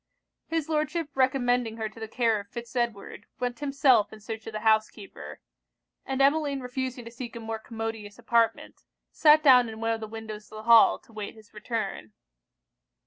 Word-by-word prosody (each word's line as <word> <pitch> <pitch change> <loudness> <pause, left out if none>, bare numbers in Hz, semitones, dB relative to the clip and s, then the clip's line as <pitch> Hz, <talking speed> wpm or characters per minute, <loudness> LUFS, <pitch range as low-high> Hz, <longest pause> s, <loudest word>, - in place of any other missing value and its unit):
His 325 -2 -2
Lordship 310 0 -1
recommending 245 -3 +1
her 220 -1 -2
to 215 - -13
the 220 - -5
care 225 -1 +1
of 200 - -10
Fitz 235 +1 -8
Edward, 230 -3 -3
went 245 0 -3
himself 275 -6 +3
in 220 - -11
search 220 +1 -7
of 225 - -6
the 215 - -4
housekeeper; 215 -2 -1 0.7
and 270 0 +1
Emmeline 285 -1 +2
refusing 250 -1 -4
to 230 - -9
seek 240 0 -8
a - - -5
more 225 0 -5
commodious 225 -2 -6
apartment, 230 -2 0 0.3
sat 305 0 +5
down 250 -5 +6
in 220 0 -9
one 225 0 0
of 225 - -1
the 220 - -5
windows 215 -1 -9
of - - -11
the 215 - -8
hall 230 0 +7
to 230 - -23
wait 210 0 -6
his 220 0 -18
return. 215 - -4
230 Hz, 185 wpm, -27 LUFS, 220-260 Hz, 0.7 s, hall